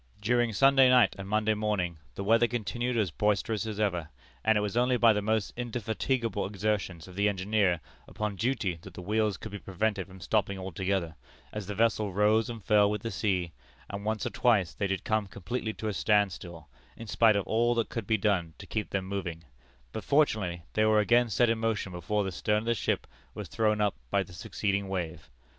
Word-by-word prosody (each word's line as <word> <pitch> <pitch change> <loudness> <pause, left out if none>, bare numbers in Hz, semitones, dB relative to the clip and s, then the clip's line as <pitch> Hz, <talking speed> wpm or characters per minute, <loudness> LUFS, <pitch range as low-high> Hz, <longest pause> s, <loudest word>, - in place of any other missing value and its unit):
"During 120 +2 +2
Sunday 135 +4 +5
night 125 -6 +5
and 95 0 -6
Monday 110 +1 +2
morning 105 -6 -1 0.2
the 100 - -4
weather 115 +3 +4
continued 120 +1 -2
as 100 -7 +1
boisterous 105 +3 0
as 105 -1 -5
ever, 90 -7 0 0.3
and 110 -1 +4
it - - +2
was 105 +1 -3
only 125 +1 +3
by 115 -2 +6
the 105 - 0
most 110 0 0
indefatigable 115 -1 -2
exertions 100 -4 -2
of 90 - -11
the 100 +1 +2
engineer 95 -3 +1 0.3
upon 105 -1 -3
duty 110 -6 -1
that 95 0 -12
the - - -7
wheels 105 +1 0
could 110 - -8
be 105 - -6
prevented 100 0 -2
from 95 0 -13
stopping 100 0 0
altogether, 95 -3 -2 0.4
as 105 -3 -5
the 105 - -4
vessel 110 -2 +1
rose 105 +4 +3
and 115 -3 -7
fell 105 -1 +5
with 105 -1 -3
the 115 - -3
sea, 90 -5 -1 0.4
and 100 0 -5
once 110 0 -1
or - - -2
twice 105 -8 +2
they 100 - -1
did 95 -1 -2
come 110 -2 0
completely 110 +4 -4
to 110 - -5
a 105 - -1
standstill, 90 -7 0 0.3
in 115 - -8
spite 110 0 +4
of 100 - 0
all 120 +2 +2
that 115 -1 0
could 115 -4 -5
be 110 - +3
done 95 -6 0
to - - -10
keep 110 -1 -3
them 95 -1 -2
moving; 90 -4 -4 0.5
but 110 - -5
fortunately 105 - +1
they 110 - +2
were 110 0 +4
again 120 +3 +3
set 120 +3 +3
in 115 0 +1
motion 110 -4 -1
before 90 +4 -1
the 95 - -3
stern 105 +4 0
of - - -9
the 115 - +2
ship 110 - -1 0.3
was - - -6
thrown 110 -1 +1
up 105 -2 +2 0.2
by - - +2
the 90 - -14
succeeding 100 +2 -2
wave. 85 -7 -4
105 Hz, 210 wpm, -29 LUFS, 95-110 Hz, 0.5 s, by